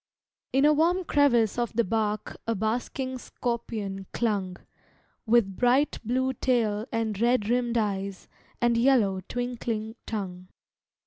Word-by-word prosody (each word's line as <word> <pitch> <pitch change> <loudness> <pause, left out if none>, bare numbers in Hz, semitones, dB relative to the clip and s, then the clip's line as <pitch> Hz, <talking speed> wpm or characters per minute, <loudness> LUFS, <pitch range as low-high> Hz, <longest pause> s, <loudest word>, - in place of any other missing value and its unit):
In 270 +2 +3
a 300 - +6
warm 345 +5 +2
crevice 245 - +3
of 240 -1 -1
the 235 +1 +2
bark 215 0 -1
A 230 - +1
basking 245 +5 -2
scorpion 220 -6 -4
clung, 200 -6 -1 0.7
With 220 -4 +3
bright 250 +6 +2
blue 260 +3 0
tail 225 -4 0
and 225 -3 -1
red 240 -3 +3
rimmed 240 -1 +1
eyes 200 -3 -2 0.3
And 240 -1 +2
yellow, 230 -7 +3
twinkling 235 -3 -3
tongue. 185 -4 -5
230 Hz, 125 wpm, -27 LUFS, 210-250 Hz, 0.7 s, a